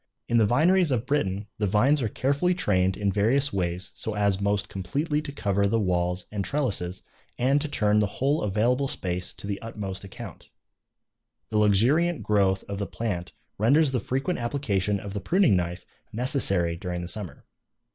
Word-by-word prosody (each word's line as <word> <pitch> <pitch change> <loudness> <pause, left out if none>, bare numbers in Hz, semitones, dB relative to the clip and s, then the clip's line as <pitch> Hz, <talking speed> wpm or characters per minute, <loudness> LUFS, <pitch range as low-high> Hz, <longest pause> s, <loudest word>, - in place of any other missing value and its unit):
In 120 0 +3
the 110 - +4
vineries 170 - +3
of 125 -3 0
Britain 105 -8 -1
the 105 - +1
vines 130 +9 +3
are 115 - 0
carefully 145 - +1
trained 95 - +1
in 100 -1 0
various 130 +8 +2
ways 90 0 -2
so 110 - -4
as 100 -1 +1
most 100 0 0
completely 145 - -2
to 150 - -7
cover 100 -7 0
the 115 +3 +1
walls 90 -2 0
and 105 -2 -2
trellises 100 -10 -2 0.3
and 135 +4 +2
to 150 - -2
turn 105 -6 +2
the 105 - +2
whole 140 +4 +1
available 120 +7 +1
space 90 -9 -3
to - - -11
the 100 -1 -4
utmost 100 -4 -6
account. 100 - -10 1.0
The 105 - +2
luxuriant 130 - +3
growth 100 -2 +2
of 100 0 -5
the 100 - -2
plant 90 -7 -4 0.3
renders 140 +7 +4
the 130 - 0
frequent 135 +10 -2
application 105 -6 -1
of 100 0 -7
the 100 - -3
pruning 180 - +3
knife 90 -1 -2 0.3
necessary 100 - +1
during 90 0 -4
the - - -5
summer. 100 -2 -7
105 Hz, 175 wpm, -26 LUFS, 95-135 Hz, 1.0 s, the